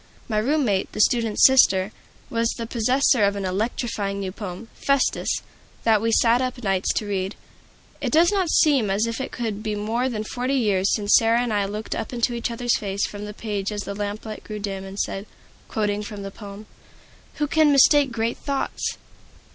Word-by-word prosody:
My 215 -2 0
room 285 +6 +1
mate, 195 -4 0
the - - -6
student's 225 -1 +3
sister, 205 -7 +5 0.4
was 230 0 +1
the 230 - -4
possessor 245 +1 +2
of 200 0 +2
an 200 -1 -3
electrifying 200 0 -2
new 190 -1 -3
poem, 195 +1 -7
"Festus," 275 -1 0 0.4
that 220 -2 +3
we 230 0 +1
sat 235 +2 +4
up 255 -1 -3
nights 195 -2 +1
to 215 - -2
read. 195 -1 -2 0.7
It - - -1
does 335 +4 +5
not 380 -4 +1
seem 275 -11 +3
as 200 +3 +1
if 230 +2 -3
it - - -5
could 220 -4 -4
be 215 -1 -2
more 225 +5 -1
than 215 -3 -3
forty 250 +5 -2
years 205 -6 +2
since 205 -1 +1
Sarah 230 +1 +3
and 240 -3 -2
I 205 -1 +1
looked 210 +2 -4
up - - -4
into 240 -1 0
each 235 +1 -2
other's 240 +1 0
face 200 -1 -1
from 205 0 -7
the 210 - -7
page 205 -3 -3
as 205 -1 -3
the 200 - -5
lamplight 210 +1 -5
grew 215 - -6
dim, 195 -2 -4
and 195 +1 -9
said, 195 +2 -3 0.4
quoting 210 -1 -1
from 210 -1 -7
the 195 - -6
poem, 200 +1 -10 0.7
"Who 300 - 0
can 305 0 +3
mistake 280 0 +5
great 230 0 -1
thoughts?" 280 -1 -3
220 Hz, 195 wpm, -23 LUFS, 205-245 Hz, 0.7 s, sister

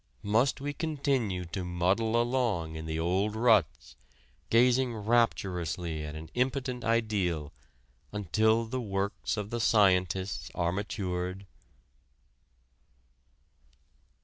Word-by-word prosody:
Must 115 +7 +2
we 145 +1 -3
continue 135 - -1
to 90 +3 -5
muddle 95 +6 +1
along 120 -10 0
in 80 0 -6
the 80 0 -2
old 95 +6 0
ruts, 110 -8 +2 0.5
gazing 125 +1 +3
rapturously 90 -7 0
at 75 0 -6
an 80 +1 -9
impotent 125 0 -1
ideal, 100 -10 0 0.6
until 110 +3 +2
the 130 +3 -3
works 100 -1 -2
of 105 0 -4
the 120 - -2
scientists 95 -3 +2
are 85 -1 +1
matured? 95 -1 -3
100 Hz, 100 wpm, -29 LUFS, 90-120 Hz, 0.6 s, gazing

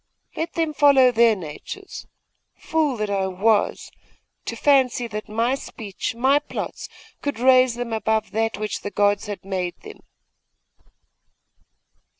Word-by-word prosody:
Let 325 +1 -3
them 325 -2 -1
follow 275 -4 +5
their 230 -1 +4
natures! 185 - -9 0.5
Fool 305 -5 0
that 215 -1 -2
I 195 -1 0
was, 205 +3 0 0.5
to - - -4
fancy 260 -4 +3
that 215 -1 -6
my 230 +4 +1
speech, 225 -6 -5
my 265 +4 +3
plots, 295 - -6 0.3
could 285 -5 -3
raise 255 0 +4
them 240 -1 -4
above 220 0 0
that 225 -1 -1
which 215 0 -4
the - - -4
gods 205 +1 +1
had 205 -2 -7
made 185 -2 -3
them! 425 0 -11
230 Hz, 135 wpm, -23 LUFS, 205-265 Hz, 0.5 s, follow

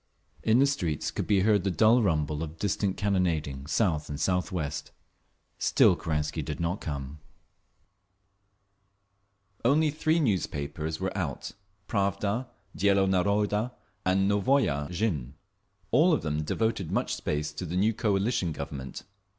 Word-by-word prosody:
In 110 +1 +3
the 135 - +5
streets 90 - -1
could - - -3
be 100 -3 +3
heard 105 -1 +3
the 100 - +1
dull 110 +8 +4
rumble 75 -6 0
of 80 0 -6
distant 100 0 -1
cannonading, 80 -9 0
south 80 -6 0
and 70 0 -5
southwest. 90 -5 -1 0.7
Still - - +4
Kerensky 75 0 -2
did 75 +3 -5
not 85 +3 -1
come… 70 -1 -5 2.4
Only 150 +5 +3
three 155 +2 +1
newspapers 80 - -1
were 95 0 -3
out—Pravda, 100 - -3 0.3
Dielo 100 0 +3
Naroda 105 +5 +1 0.3
and 95 +1 +2
Novaya 100 - +2
Zhizn. 85 - -2 0.6
All 160 +8 +5
of - - 0
them 75 -1 -1
devoted 105 +2 -1
much - - 0
space 75 +1 -2
to 75 - -6
the 90 +1 -3
new 105 +4 +3
"coalition" 100 -4 0
Government. 70 -2 -6
95 Hz, 125 wpm, -28 LUFS, 75-105 Hz, 2.4 s, the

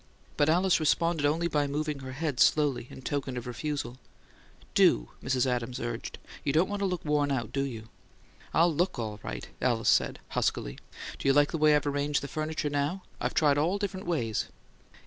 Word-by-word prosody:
But 145 - +3
Alice 180 +3 +4
responded 160 -1 +2
only 165 +3 +1
by 150 -3 +1
moving 150 0 -2
her 130 -1 -7
head 145 -2 -2
slowly, 145 -5 +3
in 130 - -11
token 135 -3 -2
of 120 - -5
refusal. 130 0 -4 0.7
"Do!" - - +4
Mrs. 130 -1 +1
Adams 125 -1 -1
urged. 120 0 -4 0.3
"You 140 - +1
don't 160 +5 +3
want 205 0 -3
to 200 - +1
look 180 -3 -3
worn 145 -1 +2
out, 120 -5 -2
do 135 - 0
you?" 115 -5 -6 0.6
"I'll 165 +1 +4
LOOK 175 +5 0
all 110 -3 -4
right," - - -6
Alice 120 -3 +2
said, - - +3
huskily. - - -1 0.4
"Do - - -2
you 135 - +6
like 145 +1 +4
the 165 - -2
way 150 0 +6
I've 150 - +1
arranged 145 0 0
the - - -3
furniture 155 0 -2
now? 145 +6 -1 0.2
I've - - -2
tried 145 -3 +4
all 165 +5 +2
the 200 - -1
different 190 -2 -4
ways 120 -11 0
it'll - - -21 0.4
go." - - -21
145 Hz, 205 wpm, -29 LUFS, 130-160 Hz, 0.7 s, you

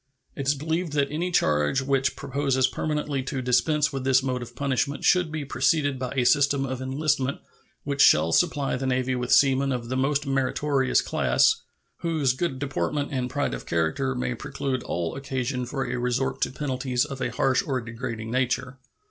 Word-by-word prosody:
It 140 - -4
is 145 - +3
believed 160 +3 -2
that 140 -1 +1
any 170 +4 -1
change 75 - +2
which 135 -1 +1
proposes 135 -1 0
permanently 150 -2 -2
to 135 +1 -4
dispense 140 +4 +2
with 135 -1 -3
this 130 0 +3
mode 130 -2 -2
of 120 0 -9
punishment 140 +1 -1
should 180 -3 +3
be 155 -2 -4
preceded 140 +1 +1
by 125 -1 -3
a 130 - +2
system 140 0 +3
of 130 -1 -4
enlistment 140 0 0 0.5
which 140 -1 -1
shall 80 +2 +6
supply 145 - +1
the 130 +1 -3
Navy 130 0 0
with 125 -1 -2
seamen 135 0 +4
of 120 -2 -3
the 130 - -1
most 140 +2 +1
meritorious 135 0 +1
class, 60 +1 +2 0.4
whose 155 -6 0
good 135 0 -2
deportment 145 +1 -2
and 130 -2 -2
pride 145 +2 -1
of - - -7
character 85 +12 0
may 125 0 -2
preclude 135 +1 -3
all 85 -2 -3
occasion 130 -2 -3
for 135 +1 -3
a - - -3
resort 125 +2 -1
to - - +1
penalties 130 -2 -1
of 135 -3 -7
a 120 - 0
harsh 130 +4 +1
or 135 -7 -1
degrading 115 -1 -6
nature. 130 +1 -1
135 Hz, 180 wpm, -25 LUFS, 125-145 Hz, 0.5 s, shall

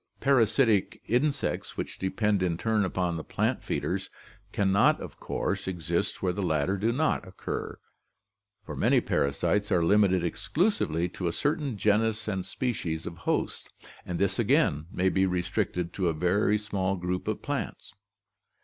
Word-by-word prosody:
Parasitic 115 -5 +3
in 125 +7 +2
sects 140 -1 -4
which - - -5
depend 100 +1 +1
in 85 -3 0
turn 110 +1 +1
upon 90 -2 -1
the 80 - -5
plant - - -1
feeders - - -2 0.4
can 100 -1 +1
not 100 - +4
of - - -9
course - - -2
exist 85 +2 -2
where 90 -1 +1
the 100 - -3
latter 80 0 +1
do 105 +4 +1
not 130 -6 0
occur, 95 - -5 0.9
for - - -6
many - - +3
parasites 85 +9 0
are 85 -2 +3
limited 95 -2 +4
exclusively 90 - 0
to 90 0 -4
a - - +1
certain 145 - -1
genus 110 +2 +2
and 95 -3 -2
species 85 -11 -2
of - - -5
host, - - -1 0.3
and 90 - -4
this 100 +3 0
again 115 - +2
may 95 - +1
be 95 0 +3
restricted 90 -1 -1
to 95 -3 0
a 85 - +2
very 95 +6 +2
small 100 -2 -1
group 90 0 -3
of - - -2
plants. - - -4
95 Hz, 160 wpm, -28 LUFS, 90-110 Hz, 0.9 s, not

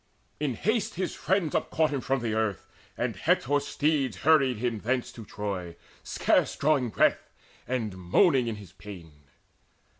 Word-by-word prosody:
In 145 -5 -1
haste 220 - 0
his 185 +1 -2
friends 185 -5 0
Upcaught 155 -1 +1
him 140 -3 -2
from 135 0 0
the 115 -2 -1
earth, 110 -4 -1 0.3
and - - -1
Hector's 145 +2 +1
steeds 140 - 0
Hurried 140 -6 +5
him 115 -1 -1
thence 125 +3 -1
to 115 - -10
Troy, 100 -5 -5 0.3
scarce - - +1
drawing 140 -4 +2
breath, - - +2 0.4
And 115 -6 -2
moaning 125 - +3
in 115 - -2
his 100 -4 -12
pain. 95 -4 -11
125 Hz, 150 wpm, -28 LUFS, 105-150 Hz, 0.4 s, Hurried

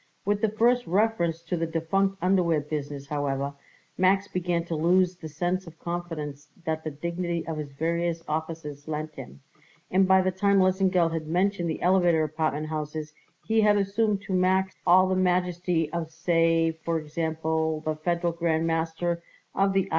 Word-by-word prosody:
With 205 +1 +1
the 220 - +3
first 240 +3 +2
reference 170 -4 +1
to 180 - -2
the 165 -1 -1
defunct 190 +5 0
underwear 180 -4 +3
business, 145 -1 -5
however, 140 -1 -2 0.5
Max 190 +2 +3
began 175 -2 -1
to 170 - -3
lose 180 +3 +3
the 160 -3 -9
sense 175 +4 -2
of 165 0 -12
confidence 160 -4 -5 0.2
that 160 0 -2
the 155 - -2
dignity 170 +3 -3
of 160 -1 -4
his 150 -2 -5
various 165 +2 -1
offices 155 -2 -4
lent 155 0 -4
him; 70 - -10 0.5
and 190 +1 +4
by 190 0 +5
the 185 - +1
time 200 +2 +2
Lesengeld 185 -3 +3
had 160 -1 -3
mentioned 180 +1 +1
the 160 - -4
elevator 175 -3 +4
apartment 155 0 -1
houses 155 0 -4 0.3
he 220 0 +3
had 210 -1 +4
assumed 200 +1 0
to 195 - -4
Max 185 +1 +2
all 185 +2 +6
the 185 - +1
majesty 180 -2 +1
of, 170 -2 -2
say, 165 0 +2
for 165 +1 -3
example, 160 0 -1
the 155 0 -2
Federal 170 +2 -1
Grand 165 -1 0
Master 165 +1 -1 0.3
of 195 0 +2
the 195 -1 +2
I. - - -13
170 Hz, 170 wpm, -26 LUFS, 160-185 Hz, 0.5 s, all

